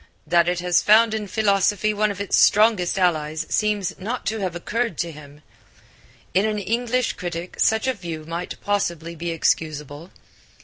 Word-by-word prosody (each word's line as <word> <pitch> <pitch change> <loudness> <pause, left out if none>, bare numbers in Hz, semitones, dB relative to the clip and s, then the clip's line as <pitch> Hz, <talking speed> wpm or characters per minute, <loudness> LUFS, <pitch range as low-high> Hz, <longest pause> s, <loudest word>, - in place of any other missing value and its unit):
That 170 +2 +3
it 180 0 -1
has 180 -1 +2
found 220 +1 +5
in 215 -2 -3
philosophy 205 0 +1
one 210 +1 +1
of 200 -1 -5
its 200 - 0
strongest 210 -4 +4
allies 155 -4 0
seems 210 -3 0
not 230 +6 -4
to 220 0 -2
have 185 -3 -3
occurred 230 +1 -2
to 170 -1 -2
him. 150 -1 -14 0.9
In 190 - +3
an 215 -1 0
English 240 +4 -1
critic 175 0 -6
such 220 +1 +2
a 260 - +1
view 170 -7 -7
might 170 +2 -5
possibly 170 -5 -2
be 170 +1 -4
excusable. 155 -1 -2
185 Hz, 165 wpm, -22 LUFS, 170-215 Hz, 0.9 s, found